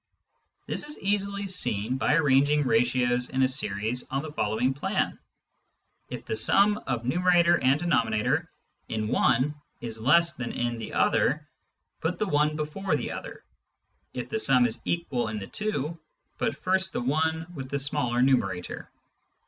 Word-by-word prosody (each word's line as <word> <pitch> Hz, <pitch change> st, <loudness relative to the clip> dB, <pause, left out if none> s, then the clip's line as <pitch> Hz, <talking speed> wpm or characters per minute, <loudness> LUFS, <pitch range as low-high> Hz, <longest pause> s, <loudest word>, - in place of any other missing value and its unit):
This -, -, -1 dB
is 300 Hz, -, -3 dB
easily 200 Hz, 0 st, 0 dB
seen 125 Hz, -, 0 dB
by 140 Hz, -, +2 dB
arranging 145 Hz, -1 st, +3 dB
ratios 125 Hz, +1 st, +2 dB
in 130 Hz, 0 st, +1 dB
a -, -, +5 dB
series 115 Hz, -2 st, -1 dB
on 135 Hz, +2 st, -2 dB
the 155 Hz, -, -6 dB
following 115 Hz, 0 st, 0 dB
plan: 140 Hz, -, -2 dB, 0.9 s
If -, -, -7 dB
the -, -, -2 dB
sum 200 Hz, -, +3 dB
of 120 Hz, -2 st, -2 dB
numerator 175 Hz, +4 st, +3 dB
and 135 Hz, +3 st, +4 dB
denominator 135 Hz, 0 st, +1 dB, 0.4 s
in 110 Hz, -1 st, -2 dB
one 130 Hz, +7 st, +2 dB, 0.3 s
is 115 Hz, -2 st, -6 dB
less 170 Hz, +8 st, +4 dB
than 125 Hz, -2 st, -5 dB
in 120 Hz, -1 st, -2 dB
the 110 Hz, -, -6 dB
other, -, -, +1 dB, 0.5 s
put 165 Hz, +3 st, -2 dB
the 215 Hz, -, 0 dB
one 150 Hz, -4 st, +1 dB
before 155 Hz, +6 st, -2 dB
the -, -, -3 dB
other; -, -, -8 dB, 0.7 s
if -, -, -5 dB
the 220 Hz, -, -2 dB
sum 130 Hz, -, +4 dB
is 115 Hz, -, -1 dB
equal 135 Hz, -9 st, -1 dB
in 110 Hz, 0 st, -4 dB
the 100 Hz, -, -5 dB
two, 170 Hz, -, -3 dB, 0.4 s
put -, -, -1 dB
first 190 Hz, 0 st, 0 dB
the -, -, -2 dB
one 160 Hz, +5 st, 0 dB
with 135 Hz, -5 st, -7 dB
the 140 Hz, -, -1 dB
smaller 135 Hz, -3 st, 0 dB
numerator. 95 Hz, -9 st, 0 dB
135 Hz, 155 wpm, -27 LUFS, 120-170 Hz, 0.9 s, a